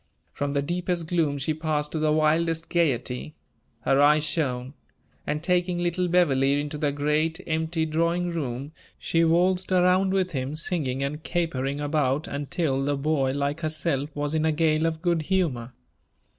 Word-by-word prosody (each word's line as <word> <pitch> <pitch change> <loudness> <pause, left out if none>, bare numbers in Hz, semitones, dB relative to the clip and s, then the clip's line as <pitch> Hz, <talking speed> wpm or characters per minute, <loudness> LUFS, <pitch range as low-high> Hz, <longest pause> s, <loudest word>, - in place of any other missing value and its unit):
From 140 0 -2
the 140 0 0
deepest 175 +1 -2
gloom 155 -4 0
she 150 +3 -1
passed 155 -1 -2
to 160 - -2
the 155 0 +2
wildest 160 +1 +1
gayety. 150 -3 -1 0.5
Her 135 +4 +3
eyes 150 +1 +5
shone; 135 -4 -2 0.5
and 150 +1 -2
taking 180 0 +1
little 175 +1 0
Beverley 140 -6 +3
into 150 0 -4
the 145 -2 +1
great, 150 +3 0
empty 160 0 -1
drawing 170 +3 0
room, 140 -2 -4 0.3
she 165 0 +1
waltzed 180 +3 +2
around 185 +1 +3
with 190 -1 0
him, 135 0 -3
singing 150 -5 -2
and 150 +3 -3
capering 145 -5 -2
about 145 -1 0
until 145 -1 -1
the 145 0 0
boy, 140 -2 0
like 145 +2 -1
herself, 155 -3 -1
was 145 0 -2
in 155 -1 +1
a 160 - +3
gale 155 0 +2
of 160 -1 -4
good 170 -2 +2
humor. 150 -9 -1
155 Hz, 160 wpm, -25 LUFS, 145-170 Hz, 0.5 s, eyes